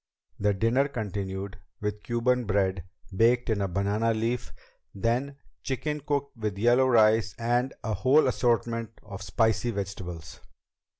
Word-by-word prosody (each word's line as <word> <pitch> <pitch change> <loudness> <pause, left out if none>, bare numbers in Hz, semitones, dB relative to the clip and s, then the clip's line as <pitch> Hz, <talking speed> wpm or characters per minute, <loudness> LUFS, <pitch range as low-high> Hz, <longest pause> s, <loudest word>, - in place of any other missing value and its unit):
The 105 0 +2
dinner 115 +7 +2
continued 100 -4 -5 0.2
with 105 0 -3
Cuban 125 +2 0
bread 95 -3 0 0.3
baked 120 +3 +3
in 105 -2 0
a 100 - +1
banana 100 +5 0
leaf; 115 +2 -2 0.4
then 120 +7 -1 0.2
chicken 150 +3 -2
cooked 140 -1 -2
with 105 -4 -3
yellow 120 +5 +4
rice 110 -4 +4
and 120 +3 +1
a 110 - -1
whole 130 +10 +4
assortment 115 -2 0
of 100 -2 -9
spicy 110 +5 +1
vegetables. 95 -7 -6
115 Hz, 130 wpm, -27 LUFS, 100-120 Hz, 0.4 s, yellow